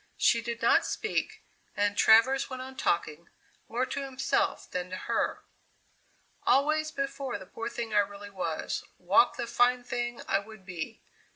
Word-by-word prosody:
She 230 - +4
did 235 +1 -5
not - - +5
speak, 435 0 -2 0.3
and 205 0 +2
Travers 230 +6 +5
went 255 -1 -5
on 265 0 -9
talking, 170 - -1 0.4
more 245 +3 0
to 280 +2 -4
himself 265 -1 0
than 180 0 -3
to 185 - -4
her. - - -1 1.0
"Always 310 +3 +3
before 275 -3 -3
the 190 - -11
poor 230 +5 -5
thing 230 -2 -5
I 210 - +5
really 205 0 -3
was, 175 -5 -3
walked - - +4
the 240 - -2
fine 245 +1 +3
thing 240 -1 -3
I 195 - +3
would 215 -1 -13
be. 175 -4 -6
235 Hz, 160 wpm, -29 LUFS, 200-265 Hz, 1.0 s, not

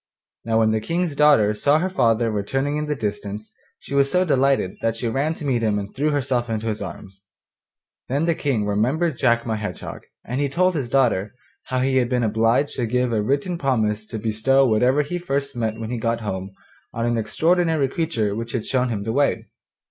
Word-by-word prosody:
Now 115 -1 +1
when 110 -1 +3
the 110 0 0
King's 165 +4 -1
daughter 140 -8 +5
saw 140 +7 +3
her 175 +4 0
father 115 -10 +2
returning 135 +8 -1
in 150 0 -2
the 150 - -1
distance 105 -2 -5 0.2
she - - -9
was 140 0 +3
so 180 +3 +2
delighted 135 - +1
that 115 0 0
she 115 +1 -2
ran 140 +7 0
to 150 - -7
meet 125 -4 +1
him 110 -2 +1
and 100 0 -5
threw 150 +3 +1
herself 130 -5 0
into 110 0 -2
his 110 -2 -2
arms. 100 0 -9 0.9
Then 140 +5 +1
the 170 - +2
King 135 -9 -1
remembered 130 +11 +1
Jack 120 0 +2
my 110 -2 -1
Hedgehog, 105 -1 -6 0.2
and 125 +4 -2
he 140 - 0
told 185 +6 +2
his 140 -7 -3
daughter 120 -5 +1 0.3
how 130 0 -1
he 130 0 +2
had 125 -2 +2
been 125 -1 +1
obliged 115 +6 +1
to 120 - 0
give 125 +1 0
a 110 - +1
written 140 - -1
promise 110 -6 0
to 110 - -5
bestow 115 +5 +2
whatever 125 +5 +3
he 175 +5 -4
first 140 -6 -2
met 110 -2 -2
when 110 +1 -5
he 120 - -2
got 115 0 -1
home 95 -3 -4 0.5
on 115 0 -1
an 120 0 +1
extraordinary 165 +3 +1
creature 130 -9 -1
which 115 +1 -5
had 115 -4 -2
shown 130 -1 0
him 105 -4 -3
the 110 +1 -2
way. 140 +2 +1
125 Hz, 210 wpm, -22 LUFS, 110-140 Hz, 0.9 s, daughter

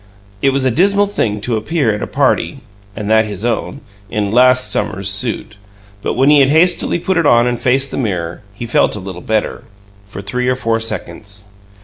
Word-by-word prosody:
It 135 - +3
was 135 0 0
a 130 - +3
dismal 200 - +3
thing 105 - -2
to 115 +2 -1
appear 125 0 0
at 105 - -5
a - - -3
"party" 140 0 0 0.3
(and 105 -2 -5
that 110 0 +3
his 105 0 -6
own) 120 +4 -2 0.3
in 105 -2 -2
"last 125 +2 +4
summer's 100 -2 -1
suit," 105 0 -2 0.4
but - - -2
when 135 +3 +4
he 150 - +6
had 135 -1 +4
hastily 170 +4 +3
put 180 +1 -1
it 165 -3 +2
on 120 -2 +5
and 120 -1 -2
faced 135 +2 +1
the - - -5
mirror, 90 -9 -3
he 105 +4 -7
felt 115 - +1
a - - -5
little 95 -2 -8
better 110 +3 -2 0.4
for 100 -1 -9
three 125 +5 -2
or 130 - +2
four 115 -2 -1
seconds. 105 -2 -5
120 Hz, 205 wpm, -16 LUFS, 105-135 Hz, 0.4 s, he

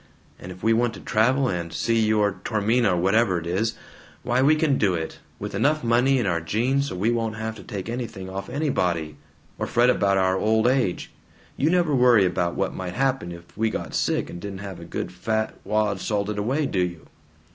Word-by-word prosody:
and 90 - -8
if 90 +1 -12
we 115 - +4
want 120 0 +1
to - - -9
travel 125 +5 +2
and 85 -5 -3
see 115 +5 0
your 105 -2 +1
Tormina 110 0 +2
or - - 0
whatever 95 +1 +2
it 85 - -9
is, 100 +7 -1 0.5
why 125 +2 +1
we 150 +4 +5
can 155 -3 +1
do 95 -4 +2
it, 80 -1 -5 0.2
with - - -6
enough 155 +1 +1
money 120 +3 +3
in 120 - 0
our 85 -3 0
jeans 125 +11 0
so - - -5
we 105 +6 +1
won't 115 -2 -1
have 110 0 -4
to - - -11
take 100 -1 -6
anything 115 -6 -5
off 95 +1 -6
anybody, 90 - -1 0.4
or - - -1
fret 120 +1 +4
about 100 -4 +2
our 95 0 +2
old 110 +1 +2
age. 125 -8 +1 0.4
You 150 - +1
never 175 -3 +2
worry 125 -6 +5
about 90 -1 0
what 95 - -1
might 90 0 -5
happen 135 -8 0
if 85 0 -12
we 110 +1 +1
got - - -5
sick - - 0
and 85 - -8
didn't 100 0 -6
have 95 -3 -7
a 85 - -9
good - - -4
fat 110 +4 -2
wad 105 -1 0
salted 105 +1 -2
away, 135 +9 0
do 100 - -1
you!" 85 -3 -3
110 Hz, 210 wpm, -24 LUFS, 95-120 Hz, 0.5 s, we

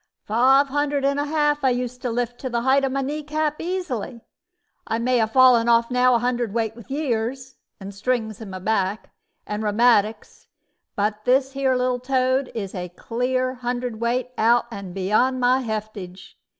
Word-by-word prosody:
"Five 265 +6 +4
hundred 290 0 0
and 280 +1 +1
a 290 - 0
half 295 -1 +1
I 265 - +4
used 250 0 -3
to 250 - -2
lift 240 +1 -3
to 260 - -4
the 235 -1 -1
height 270 +2 +3
of 270 - 0
my 275 +1 -1
knee 295 +3 -3
cap 305 0 -2
easily; 315 - -4 0.7
I 225 - -1
may 245 +1 +1
'a 220 - +2
fallen 240 0 +5
off 235 +1 +3
now 250 0 +4
a - - +5
hundred 240 -2 -1
weight 225 -1 -1
with 235 +1 -14
years, 265 -2 -3 0.2
and 200 0 -8
strings 220 0 -2
in 215 - -8
my 185 - -6
back, 195 +1 -1 0.3
and 210 0 -4
rheumatics; 215 0 +1 0.5
but 210 +1 -1
this 265 +1 +3
here 270 -1 +1
little 250 0 0
toad 260 +1 0
is 200 -4 -4
a 180 -1 -5
clear 255 +7 -2
hundredweight 245 0 -2
out 235 +2 +4
and 200 -4 -8
beyond 215 +7 +1
my 250 +1 +3
heftage. 215 -5 -6
245 Hz, 175 wpm, -23 LUFS, 220-265 Hz, 0.7 s, fallen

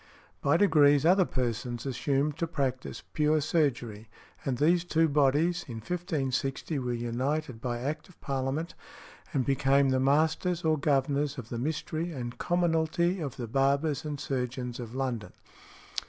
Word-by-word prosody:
By 145 +3 +3
degrees 150 -6 +5
other 185 +2 +5
persons 120 -2 -3
assumed 140 +2 0
to 165 - -1
practise 135 -5 -3
pure 155 0 +3
surgery, 125 -9 -1 0.3
and 130 -3 -1
these 170 +5 +3
two 165 -2 +2
bodies, 150 +4 +2
in 120 - -6
1560, 140 - -2
were 125 -1 -2
united 120 +2 -2
by 120 -2 -3
Act 150 +7 -4
of 180 - -20
Parliament, 135 +4 -2 0.6
and 130 -3 0
became 135 0 +3
"The 130 0 +2
Masters 160 +6 +2
or 155 -1 +3
Governors 140 0 +1
of 120 -3 -7
the 120 - -4
Mystery 160 +4 -2
and 120 -5 -6
Commonalty 175 +1 +1
of 145 -6 -4
the 120 - -4
Barbers 140 +4 +1
and 150 -2 -4
Surgeons 125 -2 -3
of 120 0 -7
London." 125 -5 -3
140 Hz, 145 wpm, -29 LUFS, 130-160 Hz, 0.6 s, degrees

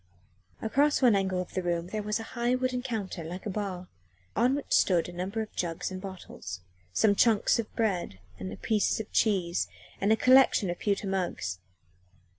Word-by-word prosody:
Across 280 +5 +2
one 240 -4 +6
angle 190 -2 0
of 180 - -5
the 185 - -1
room 175 -1 -1
there 215 +1 -2
was 210 +1 -1
a - - -5
high 240 +1 +1
wooden 255 -1 -1
counter 215 -9 -4
like 175 +4 -7
a 210 - -2
bar, 185 -3 -4 0.5
on 245 +5 +3
which 285 - -6
stood 175 -3 +4
a 175 - -9
number 190 +5 -2
of 215 - -13
jugs 170 +1 -2
and 185 0 -6
bottles, 185 - -8 0.3
some 205 - +4
chunks 220 +1 +3
of 220 - -3
bread 190 - -1 0.2
and 95 +1 -6
pieces 215 -1 +1
of 220 - -6
cheese, 180 - +1 0.3
and 200 +2 +3
a - - +7
collection 255 -6 +5
of 175 - -6
pewter 200 0 0
mugs. 175 - -2
200 Hz, 185 wpm, -29 LUFS, 180-225 Hz, 0.5 s, a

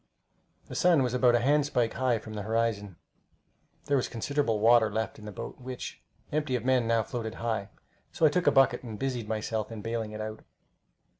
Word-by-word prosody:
The - - -10
sun 170 -6 +4
was 125 -1 -1
about 125 -1 +4
a - - +4
handspike 140 -3 +2
high 130 -2 +1
from 110 0 -9
the 105 - -4
horizon. 110 -3 -1 0.9
There 140 - +2
was 130 - 0
considerable 125 -2 -1
water 115 0 +5
left 110 +1 -3
in 105 - -11
the 105 - -6
boat, - - -7
which, 125 0 -7 0.3
empty 150 -3 0
of 120 -1 -3
men, 130 -3 +3
now 115 -1 +2
floated 115 -1 -5
high; 110 -4 -2 0.4
so 160 - +2
I - - +7
took 180 +4 0
a - - +7
bucket 135 -2 +4
and 115 -4 -7
busied 125 -4 -3
myself 110 0 -2
in 110 -2 -7
bailing 115 -1 -3
it 105 - -7
out. 110 0 -6
115 Hz, 200 wpm, -29 LUFS, 110-130 Hz, 0.9 s, I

